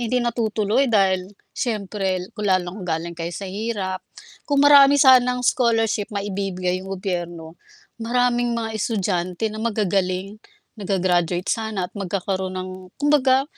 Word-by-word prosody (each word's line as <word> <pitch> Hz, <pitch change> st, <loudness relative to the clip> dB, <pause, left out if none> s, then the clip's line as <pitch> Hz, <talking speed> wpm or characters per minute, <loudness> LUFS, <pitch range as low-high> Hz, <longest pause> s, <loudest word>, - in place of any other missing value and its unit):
hindi 240 Hz, +1 st, 0 dB
natutuloy 230 Hz, +1 st, 0 dB
dahil, 190 Hz, -3 st, +2 dB, 0.2 s
siyempre 195 Hz, -5 st, -2 dB
kung 210 Hz, -2 st, -3 dB
lalong 185 Hz, +1 st, 0 dB
galing 170 Hz, +1 st, -3 dB
kayo 165 Hz, +1 st, -4 dB
sa 200 Hz, -, -6 dB
hirap. 195 Hz, -2 st, -3 dB, 0.5 s
Kung 285 Hz, -1 st, +3 dB
marami 285 Hz, -1 st, +8 dB
sanang 250 Hz, -2 st, +5 dB
scholarship 225 Hz, -4 st, +1 dB
maibibigay 190 Hz, -3 st, -2 dB
yung 195 Hz, 0 st, -5 dB
gobyerno, 175 Hz, -3 st, -4 dB, 0.5 s
maraming 240 Hz, +1 st, +1 dB
mga 225 Hz, -1 st, -3 dB
estudyante 190 Hz, -3 st, -1 dB
na 215 Hz, -, -7 dB
magagaling, 195 Hz, -2 st, -1 dB, 0.4 s
na 205 Hz, -, -7 dB
ga-gra-graduate 180 Hz, -2 st, +1 dB
sana 220 Hz, -4 st, -2 dB
at -, -, -47 dB
magkakaroon 190 Hz, -1 st, -3 dB
ng 185 Hz, 0 st, -4 dB, 0.3 s
kumbaga 275 Hz, -2 st, +3 dB
200 Hz, 130 wpm, -22 LUFS, 185-235 Hz, 0.5 s, marami